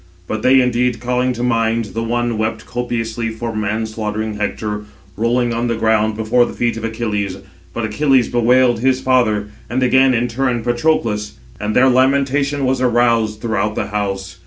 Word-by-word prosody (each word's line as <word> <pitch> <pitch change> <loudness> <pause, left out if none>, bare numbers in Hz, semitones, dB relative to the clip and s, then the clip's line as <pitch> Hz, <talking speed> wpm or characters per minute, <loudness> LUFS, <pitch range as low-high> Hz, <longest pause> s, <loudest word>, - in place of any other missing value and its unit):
But 110 +4 -4
they 130 +2 +5
indeed, 125 -1 0
calling 125 +2 0
to 120 0 -4
mind, 115 -1 +1
the 115 - -2
one 120 +1 -1
794 115 - -3
wept 110 0 -2
copiously 115 -2 -3
[for] 115 0 -5
man 110 +1 -1
slaughtering 110 0 -3
Hector, 105 0 -3 0.3
rolling 120 +2 +1
[on 120 +1 -1
the 115 - 0
ground] 110 -1 +1
before 110 +3 +2
the - - -7
feet 120 -1 -1
of 115 - -6
Achilles; 105 -4 -2 0.3
but 115 +4 -3
Achilles 130 +3 +2
bewailed 120 0 +3
his 130 +1 +2
father, 110 -6 +1 0.2
and 130 +3 0
again 130 0 +4
in 120 +1 +1
turn 120 -1 -1
Patroclus; 120 -4 0 0.3
and 105 0 -2
their 130 +1 +5
lamentation 140 +2 +2
was 130 0 0
aroused 115 -3 +2
throughout 110 -2 -1
the - - -3
house. 95 -3 -3
115 Hz, 175 wpm, -18 LUFS, 110-125 Hz, 0.3 s, they